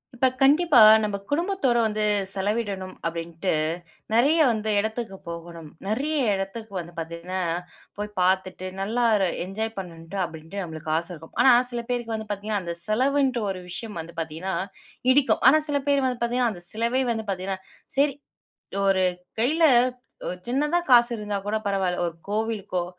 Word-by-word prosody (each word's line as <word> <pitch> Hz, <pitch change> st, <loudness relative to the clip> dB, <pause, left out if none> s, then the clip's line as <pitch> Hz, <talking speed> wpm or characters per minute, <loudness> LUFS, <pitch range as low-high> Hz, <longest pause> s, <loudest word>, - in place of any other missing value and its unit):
இப்போ 260 Hz, +2 st, +3 dB
கண்டிப்பா. 295 Hz, +1 st, +5 dB, 0.2 s
நம்ம 210 Hz, -1 st, -1 dB
குடும்பத்தோடு 295 Hz, -6 st, +1 dB
வந்து 215 Hz, -1 st, -1 dB, 0.3 s
செலவிடணும் 200 Hz, -2 st, -2 dB
அப்படின்ட்டு 165 Hz, +2 st, -2 dB, 0.6 s
நெறைய 275 Hz, +8 st, +4 dB
வந்து 220 Hz, -1 st, -2 dB
எடத்திக்கு 220 Hz, -1 st, -3 dB
போகணும். 170 Hz, -1 st, -8 dB, 0.2 s
நெறைய 280 Hz, +9 st, 0 dB, 0.2 s
எடத்திறக்கு 200 Hz, +3 st, -5 dB
வந்து 175 Hz, -1 st, -6 dB
பார்த்தீங்கனா 170 Hz, +3 st, -5 dB, 0.6 s
போய் 210 Hz, 0 st, -3 dB
பார்த்துட்டு 185 Hz, 0 st, +1 dB
நல்லா 220 Hz, +5 st, 0 dB
ஒரு 195 Hz, -2 st, +2 dB, 0.2 s
என்ஜாய் 220 Hz, +4 st, -3 dB
பண்ணனுட்டு 170 Hz, 0 st, -8 dB
அப்படின்ட்டு 165 Hz, +4 st, -7 dB
நமக்கு 160 Hz, -2 st, -7 dB
ஆச 170 Hz, +1 st, -2 dB
இருக்கும். 160 Hz, -1 st, -12 dB
ஆனா 260 Hz, -, +7 dB, 0.2 s
சில 240 Hz, -1 st, -2 dB
பேரு 245 Hz, -1 st, -1 dB
வந்து 220 Hz, -1 st, -4 dB
பார்த்தீங்கனா 205 Hz, 0 st, -2 dB
அந்த 170 Hz, -1 st, -4 dB
செலவுன்ற 260 Hz, +4 st, +2 dB
ஒரு 185 Hz, -1 st, -4 dB
விஷயம் 210 Hz, +2 st, -5 dB
வந்து 165 Hz, +1 st, -12 dB
பார்த்தீங்கனா 165 Hz, +4 st, -4 dB, 0.6 s
இடிக்கும். 275 Hz, +1 st, +3 dB
ஆனா 310 Hz, +4 st, +5 dB
சில 290 Hz, -1 st, +1 dB
பேர் 280 Hz, -2 st, +3 dB
வந்து 250 Hz, -2 st, -2 dB
பார்த்தீங்கனா 240 Hz, +1 st, +1 dB
அந்த 175 Hz, -2 st, -8 dB
செலவே 235 Hz, +4 st, 0 dB
வந்து 220 Hz, -1 st, -3 dB
பார்த்தீங்கனா, 190 Hz, +1 st, -3 dB, 0.4 s
சரி 280 Hz, -1 st, +3 dB, 0.7 s
ஒரு 190 Hz, -1 st, +3 dB, 0.4 s
கையில 305 Hz, +8 st, +2 dB, 0.6 s
ஒரு 180 Hz, -, -3 dB
சின்னதா 295 Hz, +7 st, +1 dB
காசு 240 Hz, -1 st, +7 dB
இருந்தா 210 Hz, -1 st, -3 dB
கூட 215 Hz, -, +1 dB
பரவால்ல 190 Hz, -3 st, 0 dB
ஒரு 165 Hz, -, -6 dB
கோவிலுக்கோ, 210 Hz, -4 st, -1 dB
210 Hz, 150 wpm, -25 LUFS, 180-245 Hz, 0.7 s, ஆனா